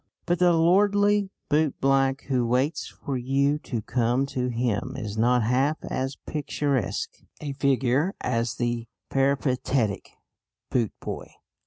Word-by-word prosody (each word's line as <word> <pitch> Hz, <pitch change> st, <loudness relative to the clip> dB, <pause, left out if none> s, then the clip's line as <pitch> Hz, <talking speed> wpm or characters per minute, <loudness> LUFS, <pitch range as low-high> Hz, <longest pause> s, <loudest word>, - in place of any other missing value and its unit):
But 175 Hz, 0 st, +1 dB
the 180 Hz, -1 st, +5 dB
lordly 205 Hz, +4 st, +3 dB, 0.2 s
bootblack 135 Hz, -2 st, +2 dB
who 125 Hz, -3 st, 0 dB
waits 130 Hz, +6 st, 0 dB
for 140 Hz, -4 st, -5 dB
you 140 Hz, +4 st, +1 dB
to 120 Hz, -8 st, -4 dB
come 120 Hz, +3 st, +1 dB
to 125 Hz, -1 st, 0 dB
him 120 Hz, +1 st, -1 dB
is 105 Hz, -5 st, -5 dB
not 120 Hz, +2 st, +3 dB
half 135 Hz, +7 st, +2 dB
as 135 Hz, +1 st, -2 dB
picturesque 140 Hz, -7 st, -2 dB, 0.2 s
a 145 Hz, -2 st, -4 dB
figure 135 Hz, +5 st, +1 dB
as 115 Hz, -2 st, -1 dB
the 120 Hz, -1 st, -2 dB, 0.2 s
peripatetic 135 Hz, -5 st, +1 dB, 0.6 s
bootboy. 120 Hz, -5 st, -2 dB
135 Hz, 120 wpm, -26 LUFS, 120-145 Hz, 0.6 s, the